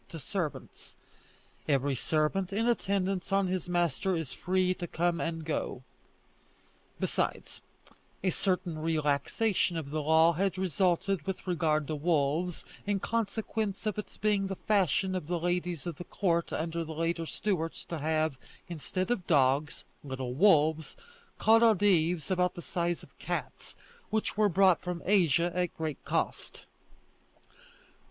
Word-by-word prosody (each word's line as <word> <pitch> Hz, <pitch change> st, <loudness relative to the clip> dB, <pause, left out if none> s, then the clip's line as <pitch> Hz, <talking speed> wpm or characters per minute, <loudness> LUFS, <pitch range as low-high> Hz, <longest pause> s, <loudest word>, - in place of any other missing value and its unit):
to 165 Hz, -, -7 dB
servants: 170 Hz, -1 st, -5 dB, 0.7 s
"Every 140 Hz, -1 st, +2 dB
servant 155 Hz, +8 st, 0 dB
in 220 Hz, +4 st, 0 dB
attendance 195 Hz, -4 st, 0 dB
on 195 Hz, 0 st, +3 dB
his 185 Hz, -1 st, -2 dB
master 175 Hz, +1 st, +1 dB
is 160 Hz, -5 st, -4 dB
free 185 Hz, 0 st, +1 dB
to 175 Hz, -1 st, -6 dB
come 170 Hz, +1 st, 0 dB
and 165 Hz, -1 st, -3 dB
go." 150 Hz, -4 st, -3 dB, 1.2 s
Besides, -, -, -2 dB, 0.6 s
a 185 Hz, -, +2 dB
certain 180 Hz, -4 st, -1 dB
relaxation 160 Hz, -, +1 dB
of 145 Hz, -3 st, -5 dB
the 155 Hz, 0 st, -1 dB
law 160 Hz, +2 st, +5 dB
had 190 Hz, +2 st, 0 dB
resulted 185 Hz, -1 st, 0 dB
with 190 Hz, -, -4 dB
regard 155 Hz, -4 st, +1 dB
to 155 Hz, -, -3 dB
wolves, 160 Hz, +2 st, 0 dB, 0.2 s
in 205 Hz, -1 st, +1 dB
consequence 220 Hz, -1 st, -2 dB
of 210 Hz, -1 st, -1 dB
its 210 Hz, -, -8 dB
being 205 Hz, -2 st, +1 dB
the 195 Hz, -, -3 dB
fashion 190 Hz, -2 st, +1 dB
of 180 Hz, -5 st, -3 dB
the 175 Hz, 0 st, -1 dB
ladies 175 Hz, -2 st, -1 dB
of 170 Hz, -4 st, -4 dB
the -, -, -6 dB
Court, 170 Hz, -2 st, 0 dB
under 165 Hz, +1 st, -2 dB
the 160 Hz, 0 st, -7 dB
later 165 Hz, 0 st, -1 dB
Stuarts, 170 Hz, -5 st, -2 dB
to 170 Hz, -, -5 dB
have, 155 Hz, -2 st, 0 dB, 0.3 s
instead 180 Hz, +4 st, -3 dB
of 195 Hz, -7 st, -1 dB
dogs, 140 Hz, -1 st, +2 dB, 0.2 s
little 130 Hz, -3 st, -4 dB
wolves, 160 Hz, -1 st, +3 dB, 0.4 s
called 225 Hz, +1 st, +5 dB
adives, 180 Hz, -7 st, +3 dB
about 180 Hz, -1 st, +1 dB
the 175 Hz, -, -7 dB
size 175 Hz, -1 st, -2 dB
of -, -, -17 dB
cats, -, -, -5 dB, 0.3 s
which 220 Hz, 0 st, -1 dB
were 210 Hz, 0 st, +3 dB
brought 185 Hz, -2 st, +4 dB
from 180 Hz, -2 st, -4 dB
Asia 175 Hz, -4 st, +3 dB
at 180 Hz, -1 st, -1 dB
great 155 Hz, -3 st, -4 dB
cost. -, -, -2 dB
175 Hz, 145 wpm, -30 LUFS, 155-190 Hz, 1.2 s, law